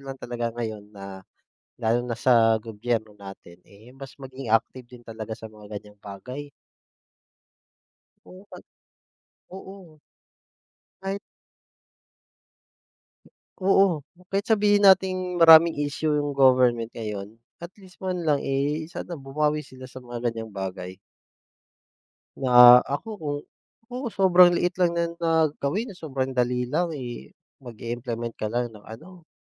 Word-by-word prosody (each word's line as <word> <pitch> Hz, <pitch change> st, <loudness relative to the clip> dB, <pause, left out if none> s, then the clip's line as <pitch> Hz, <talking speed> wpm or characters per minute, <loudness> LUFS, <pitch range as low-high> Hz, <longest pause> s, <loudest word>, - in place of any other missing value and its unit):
lang 135 Hz, -, -6 dB
talaga 120 Hz, -2 st, -4 dB
ngayon 110 Hz, -3 st, -5 dB
na, 100 Hz, -1 st, -9 dB, 0.6 s
lalo 115 Hz, 0 st, +1 dB
na 120 Hz, -2 st, -5 dB
sa 115 Hz, -3 st, +4 dB
gobyerno 110 Hz, 0 st, -4 dB
natin, 95 Hz, -3 st, -13 dB
eh, 110 Hz, +5 st, -17 dB
mas 135 Hz, +1 st, -12 dB
maging 135 Hz, -2 st, -9 dB
active 115 Hz, +3 st, 0 dB
din 120 Hz, -1 st, -15 dB
talaga 110 Hz, 0 st, -7 dB
sa 110 Hz, -, -10 dB
mga 105 Hz, -1 st, -9 dB
ganyang 105 Hz, 0 st, -15 dB
bagay. 125 Hz, +9 st, -8 dB, 1.8 s
Oo, 185 Hz, +1 st, -14 dB
pag -, -, -11 dB, 0.9 s
oo. 190 Hz, -3 st, -12 dB, 1.0 s
Kahit 195 Hz, +1 st, -3 dB, 2.4 s
Oo. 190 Hz, -3 st, +3 dB, 0.3 s
Kahit 200 Hz, +4 st, -1 dB
sabihin 205 Hz, -2 st, +3 dB
nating 185 Hz, -1 st, +2 dB
maraming 165 Hz, 0 st, +8 dB
issue 145 Hz, +1 st, -1 dB
'yong 145 Hz, -1 st, -1 dB
government 125 Hz, -4 st, +3 dB
ngayon. 105 Hz, -1 st, -6 dB, 0.2 s
At 170 Hz, -, -7 dB
least, 190 Hz, -2 st, -18 dB
man 180 Hz, -2 st, -3 dB
lang, 145 Hz, -2 st, +2 dB
eh, 145 Hz, +3 st, -2 dB
sana 175 Hz, -, -6 dB
bumawi 150 Hz, +1 st, -1 dB
sila 130 Hz, -3 st, -13 dB
sa 130 Hz, 0 st, -11 dB
mga 120 Hz, -1 st, -3 dB
ganyang 115 Hz, -1 st, -7 dB
bagay 95 Hz, -2 st, -6 dB, 1.4 s
Na 125 Hz, -2 st, +8 dB
ako, 145 Hz, +10 st, -4 dB
kung 145 Hz, -2 st, -3 dB, 0.5 s
Naku, 250 Hz, 0 st, -4 dB
sobrang 180 Hz, -4 st, +5 dB
liit 175 Hz, +1 st, 0 dB
lang 170 Hz, -1 st, +2 dB
niyan 170 Hz, 0 st, -1 dB
na 160 Hz, -2 st, +2 dB
gawin, 205 Hz, -, -2 dB
sobrang 135 Hz, -7 st, -4 dB
dali 125 Hz, 0 st, 0 dB
lang, 160 Hz, +5 st, -2 dB
eh, 120 Hz, -, -7 dB, 0.3 s
mag-i-implement 120 Hz, -1 st, -6 dB
ka 110 Hz, -, -1 dB
lang 120 Hz, +1 st, -2 dB
ng 105 Hz, -, -14 dB
ano, 165 Hz, +9 st, -13 dB
130 Hz, 130 wpm, -25 LUFS, 115-165 Hz, 2.4 s, maraming